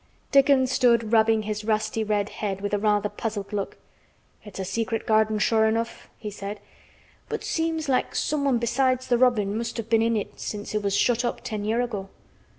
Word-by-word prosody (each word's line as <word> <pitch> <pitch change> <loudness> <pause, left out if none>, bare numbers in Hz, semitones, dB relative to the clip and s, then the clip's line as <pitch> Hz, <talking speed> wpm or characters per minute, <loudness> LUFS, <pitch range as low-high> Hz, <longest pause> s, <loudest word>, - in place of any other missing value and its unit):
Dickon 275 -1 +5
stood 235 -4 +2
rubbing 220 -1 +4
his 215 0 -3
rusty 220 0 0
red 210 -1 0
head 195 -3 -4
with 205 +1 -4
a 205 - +2
rather 210 -1 +2
puzzled 210 -1 -5
look. 200 -1 -3 0.7
"It's 210 -3 -11
a 190 - -3
secret 225 +3 -2
garden 220 -1 +3
sure 220 +1 +3
enough," 230 +1 -2
he 210 - -6
said, 200 +1 -6 0.7
"but - - -3
seems 320 -1 -1
like 260 -2 0
someone 280 -4 +1
besides 255 +2 +1
th' 240 -1 +3
robin 215 -6 +3
must 230 +2 -3
have 230 0 -6
been 225 -1 +5
in 230 0 +2
it 205 - -5
since 205 0 -5
it 210 - 0
was 200 -1 0
shut 240 0 +2
up 240 - -2
ten 210 -2 -4
year' 225 +3 +1
ago." 205 -6 -4
220 Hz, 190 wpm, -25 LUFS, 210-240 Hz, 0.7 s, Dickon